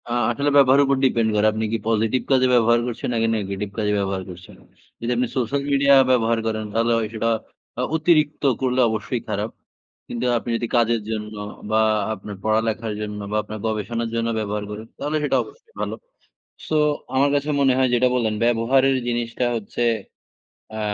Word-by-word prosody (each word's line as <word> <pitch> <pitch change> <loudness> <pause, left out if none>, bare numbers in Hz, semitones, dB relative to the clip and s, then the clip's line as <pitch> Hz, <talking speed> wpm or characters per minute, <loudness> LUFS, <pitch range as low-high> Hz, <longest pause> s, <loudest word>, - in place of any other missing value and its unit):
আ - - -5 0.2
আসলে 140 +5 0
ব্যবহারের 140 0 +6
উপর 135 0 +2
depend 115 -3 +2
করে। 105 0 +3
আপনি 110 +1 -2
কি - - +2
positive 115 +3 +1
কাজে 130 -1 +4
ব্যবহার 120 -1 +4
করছেন 120 0 -4
নাকি 115 -1 +1
negetive 100 -1 -4
কাজে 105 -2 0
ব্যবহার 95 -1 -2
করছেন। 90 +1 -11 0.4
যদি 115 +1 -2
আপনি 125 +1 +1
সোশ্যাল 130 +3 0
মিডিয়া 140 0 +4 0.2
ব্যবহার 115 -2 +2
করেন 110 -1 -2
তাহলে 115 +1 +1
হয় 110 -1 -1
সেটা 115 +1 0 0.5
অ - - +1
অতিরিক্ত 155 -2 +2 0.2
করলে 130 -1 +1
অবশ্যই 110 +2 -3
খারাপ। 105 +1 -2 0.6
কিন্তু 120 +1 -4
আপনি 120 - -5
যদি 120 - -3
কাজের 115 -1 +2
জন্য 105 -1 -4 0.4
বা 110 0 +4 0.3
আপনার 105 0 -8
পড়ালেখার 110 0 0
জন্য 105 -1 -5
বা 105 - 0
আপনার 110 +1 -7
গবেষণার 110 +2 -2
জন্য 115 0 0
ব্যবহার 105 -1 -3
করেন 110 +2 -7
তাহলে 150 +1 -1
সেটা 145 - +2
অবশ্যই 460 -1 -18
ভালো। - - -2 0.7
সো 155 - +1 0.4
আমার 140 +2 +3
কাছে 145 +1 0
মনে 135 -2 +4
হয় 130 -1 +3
যেটা 125 +1 +3
বললেন 115 -4 0
ব্যবহারের 130 +3 +3
জিনিসটা 120 +1 -2
হচ্ছে 115 +2 -4 1.0
আ - - -3
115 Hz, 175 wpm, -22 LUFS, 110-130 Hz, 1.0 s, ব্যবহারের